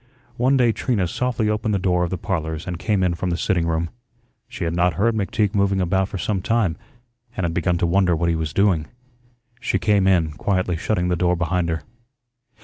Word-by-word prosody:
One 130 Hz, +3 st, +3 dB
day 120 Hz, -3 st, +4 dB
Trina 110 Hz, -5 st, 0 dB
softly 120 Hz, +3 st, -1 dB
opened 105 Hz, 0 st, 0 dB
the -, -, +2 dB
door 90 Hz, -2 st, +1 dB
of 85 Hz, -, -1 dB
the 95 Hz, -, -3 dB
"Parlors" 80 Hz, -5 st, -3 dB
and 90 Hz, -1 st, -5 dB
came 100 Hz, -1 st, +1 dB
in 90 Hz, -1 st, +2 dB
from 90 Hz, +2 st, -3 dB
the 85 Hz, -, -1 dB
sitting 85 Hz, -3 st, 0 dB
room. 85 Hz, 0 st, -1 dB, 0.6 s
She -, -, -6 dB
had 85 Hz, 0 st, -1 dB
not 90 Hz, -1 st, +2 dB
heard 115 Hz, +6 st, +2 dB
McTeague 105 Hz, 0 st, 0 dB
moving 100 Hz, -1 st, +2 dB
about 95 Hz, +1 st, +1 dB
for -, -, -5 dB
some 95 Hz, 0 st, -1 dB
time 105 Hz, -5 st, +1 dB, 0.6 s
and 95 Hz, -, -1 dB
had 85 Hz, -, -1 dB
begun 90 Hz, +1 st, +1 dB
to 85 Hz, -, 0 dB
wonder 90 Hz, 0 st, +3 dB
what 85 Hz, +2 st, 0 dB
he 85 Hz, -, +2 dB
was 80 Hz, -2 st, -2 dB
doing. 90 Hz, -3 st, +2 dB, 0.7 s
She -, -, 0 dB
came 100 Hz, +1 st, +2 dB
in, 85 Hz, -5 st, +3 dB
quietly 90 Hz, +6 st, -1 dB
shutting 90 Hz, +1 st, -1 dB
the 90 Hz, -, +2 dB
door 90 Hz, +1 st, +2 dB
behind 90 Hz, 0 st, 0 dB
her. 80 Hz, -2 st, -2 dB
90 Hz, 215 wpm, -22 LUFS, 85-100 Hz, 0.7 s, day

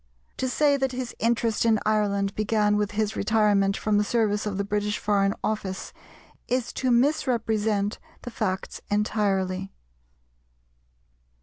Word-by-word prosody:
To 260 Hz, -, -1 dB
say 285 Hz, +2 st, +3 dB
that 265 Hz, -1 st, -1 dB
his 250 Hz, -1 st, -4 dB
interest 230 Hz, -1 st, +1 dB
in 225 Hz, -2 st, +3 dB
Ireland 200 Hz, -2 st, +1 dB
began 210 Hz, -1 st, +1 dB
with 210 Hz, -1 st, -1 dB
his 215 Hz, 0 st, -1 dB
retirement 205 Hz, -2 st, +2 dB
from 210 Hz, -1 st, +1 dB
the -, -, +3 dB
service 215 Hz, -1 st, 0 dB
of 200 Hz, -2 st, -3 dB
the 200 Hz, -, 0 dB
British 210 Hz, +1 st, -1 dB
Foreign 200 Hz, -1 st, +1 dB
Office 200 Hz, -3 st, -3 dB, 0.5 s
is 250 Hz, -1 st, -1 dB
to 260 Hz, -, -1 dB
misrepresent 225 Hz, -5 st, +1 dB, 0.2 s
the 245 Hz, -, -6 dB
facts 190 Hz, -4 st, -3 dB
entirely. 195 Hz, -2 st, 0 dB
210 Hz, 130 wpm, -25 LUFS, 200-230 Hz, 0.5 s, say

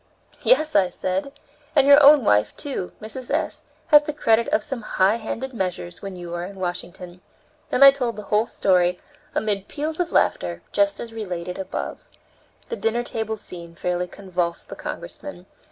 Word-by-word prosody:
"Yes," 310 Hz, -11 st, +3 dB
I 190 Hz, -3 st, +4 dB
said, 185 Hz, +8 st, -3 dB, 0.4 s
"and -, -, +5 dB
your 285 Hz, +1 st, +8 dB
own 285 Hz, -1 st, +8 dB
wife, 105 Hz, -, +2 dB
too, 265 Hz, -11 st, -4 dB
Mrs. 235 Hz, +4 st, -7 dB
S., -, -, -1 dB, 0.3 s
has 295 Hz, -1 st, +8 dB
the 300 Hz, 0 st, -5 dB
credit 230 Hz, -6 st, +2 dB
of 310 Hz, +2 st, +1 dB
some 270 Hz, -5 st, -4 dB
high 200 Hz, +1 st, +2 dB
handed 245 Hz, +4 st, -5 dB
measures 180 Hz, -4 st, -4 dB
when 195 Hz, -2 st, -6 dB
you 175 Hz, -1 st, -7 dB
are 175 Hz, 0 st, -3 dB
in 195 Hz, +3 st, -8 dB
Washington." 180 Hz, 0 st, -6 dB, 0.5 s
Then 270 Hz, -, +4 dB
I 275 Hz, -, +11 dB
told 250 Hz, -4 st, -2 dB
the 210 Hz, -, -7 dB
whole 210 Hz, +3 st, +1 dB
story, 180 Hz, -2 st, +2 dB, 0.4 s
amid 205 Hz, -2 st, -1 dB
peals 310 Hz, +2 st, -4 dB
of 350 Hz, -1 st, -1 dB
laughter, -, -, +1 dB
just 300 Hz, 0 st, +2 dB
as 230 Hz, -1 st, -7 dB
related 180 Hz, -5 st, -5 dB
above. 190 Hz, -, -4 dB, 0.7 s
The 470 Hz, -, -3 dB
dinner 235 Hz, +2 st, 0 dB
table 220 Hz, -2 st, -3 dB
scene 170 Hz, -4 st, -10 dB
fairly 180 Hz, +1 st, -2 dB
convulsed 180 Hz, -3 st, -3 dB
the -, -, -7 dB
Congressman. 185 Hz, -12 st, -8 dB
210 Hz, 170 wpm, -23 LUFS, 180-275 Hz, 0.7 s, I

